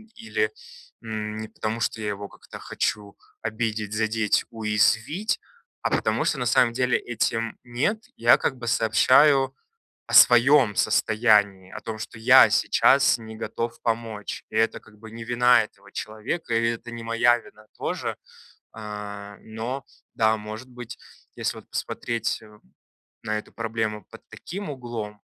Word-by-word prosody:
или, 445 - -1 0.5
м, 110 -1 -5
не 110 - -5
потому, 110 +2 -4
что 110 0 -2
я 105 - -2
его 100 0 -5
как-то - - -13
хочу 100 -1 -3 0.3
обидеть, 110 -2 -3
задеть, 110 -1 +1
уязвить, 110 - +1 0.4
а - - -1
потому - - +1
что 145 - 0
на 125 - -1
самом 120 0 +3
деле 125 0 +2
этим 115 -1 -2
нет 145 - -1
я 120 +1 +6
как 130 - -2
бы 120 -1 -7
сообщаю 135 +4 +4 0.5
о - - -8
своем 120 -2 +7
состоянии, 105 -6 +2
о - - -8
том, 110 -1 -6
что 115 - -7
я 110 - +7
сейчас 135 -1 +4
не 110 -2 -10
готов 115 +1 -4
помочь. 115 -2 -3
И 110 - -6
это 115 +1 +1
как 105 -1 -20
бы 110 +1 -11
не 115 - -8
вина 120 +1 +4
этого 100 -1 -13
человека, 110 +6 -4
и 115 0 +2
это 115 +1 -6
не 115 -1 -7
моя 115 +1 +3
вина 110 -2 -17
тоже, - - -3 0.6
э, 105 -1 -7
но 115 +5 -5 0.3
да, 110 0 +2
может 110 +4 -8
быть, 120 -2 -9 0.4
если - - -2
вот - - -15
посмотреть, 115 0 -3
э, 105 -1 -16 0.7
на 110 0 -1
эту - - -8
проблему 110 -2 -3
под 115 - -13
таким 195 +2 -7
углом, 120 -6 -6
115 Hz, 150 wpm, -25 LUFS, 110-120 Hz, 0.7 s, своем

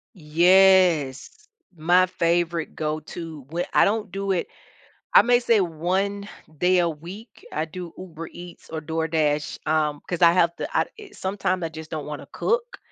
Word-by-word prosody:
Yes, 175 -3 +4 0.4
my 175 +3 +4
favorite 170 -2 -1
go 155 0 -2
to 155 -3 -9
whe 170 +3 -2
I - - +6
don't 210 -1 0
do 195 +1 -2
it 180 - 0 0.7
I - - +9
may 245 0 +3
say 230 -4 +3
one 190 +5 -2 0.3
day 180 +2 +3
a 170 - +2
week, 180 +9 -11
I 155 - -2
do 170 +1 -8
Uber 165 -3 -8
Eats 175 0 -12
or 160 -1 -5
DoorDash, 155 -2 -1
um, 150 -2 0
'cause 175 -1 -4
I 170 -1 +7
have 170 -1 +3
to - - -4
I - - +3 0.3
sometimes 190 - -2
I 165 - -3
just 160 0 -10
don't 155 -3 -4
wanna 150 -1 -7
cook 480 +1 -1
170 Hz, 165 wpm, -24 LUFS, 155-185 Hz, 0.7 s, I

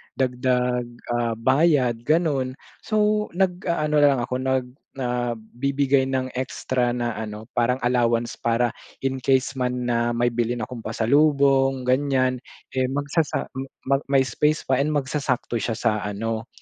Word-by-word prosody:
dagdag, 125 -1 0 0.2
ah, 120 -1 0
bayad, 130 0 +3
gano'n. 145 -5 +1 0.2
So, 210 0 +1
nag-aano 170 -5 +1
na 145 - +6
lang - - -2
ako, 125 - -3
nag 130 -1 0 0.3
nagbibigay 130 +2 0
ng 130 -1 -1
extra 125 -1 -1
na 120 -1 -1
ano, 110 +1 -7
parang 120 +1 +2
allowance 120 -1 +1
para 120 0 +1 0.3
in 135 0 -1
case 130 0 +2
man 125 0 -1
na 120 -1 0
may 120 0 +2
bilhin 120 0 -1
akong 125 +2 -6
pasalubong, 135 +3 +2
ganiyan, 130 0 +1 0.3
eh, 130 -1 0
magsasa 145 +3 -1 0.4
mag 135 0 +2
may 135 -1 +4
space 150 +5 0
pa 130 -1 +1
and 150 +2 +1
magsasakto 130 -4 -1
siya 115 +2 -2
sa 110 -2 0
ano, 110 +3 -3
130 Hz, 135 wpm, -24 LUFS, 120-140 Hz, 0.4 s, na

